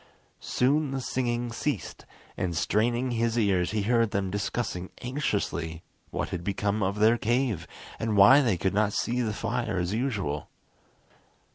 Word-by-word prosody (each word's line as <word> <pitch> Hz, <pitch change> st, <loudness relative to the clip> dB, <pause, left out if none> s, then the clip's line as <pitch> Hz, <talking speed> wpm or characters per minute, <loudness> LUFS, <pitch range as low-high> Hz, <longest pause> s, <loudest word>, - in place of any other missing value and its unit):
Soon 145 Hz, +4 st, +1 dB
the 135 Hz, 0 st, -2 dB
singing 120 Hz, -1 st, -1 dB
ceased, 115 Hz, -, -4 dB, 0.3 s
and 85 Hz, -3 st, -2 dB
straining 120 Hz, +7 st, +1 dB
his 115 Hz, 0 st, 0 dB
ears 95 Hz, -5 st, +2 dB
he 105 Hz, +1 st, -1 dB
heard 115 Hz, +1 st, +2 dB
them 95 Hz, -2 st, -1 dB
discussing 100 Hz, -2 st, -3 dB
anxiously 100 Hz, -, -2 dB, 0.3 s
what -, -, -3 dB
had 90 Hz, -2 st, -4 dB
become 100 Hz, +2 st, -1 dB
of 100 Hz, +1 st, 0 dB
their 110 Hz, +3 st, +4 dB
cave, 115 Hz, -7 st, 0 dB, 0.3 s
and 110 Hz, -2 st, 0 dB
why 120 Hz, +9 st, +8 dB
they 115 Hz, -9 st, +1 dB
could 95 Hz, +3 st, 0 dB
not 105 Hz, 0 st, +2 dB
see 125 Hz, +2 st, 0 dB
the 110 Hz, -3 st, 0 dB
fire 115 Hz, -1 st, -2 dB
as 90 Hz, +2 st, -1 dB
usual. 105 Hz, -, -2 dB
110 Hz, 150 wpm, -27 LUFS, 95-120 Hz, 0.3 s, why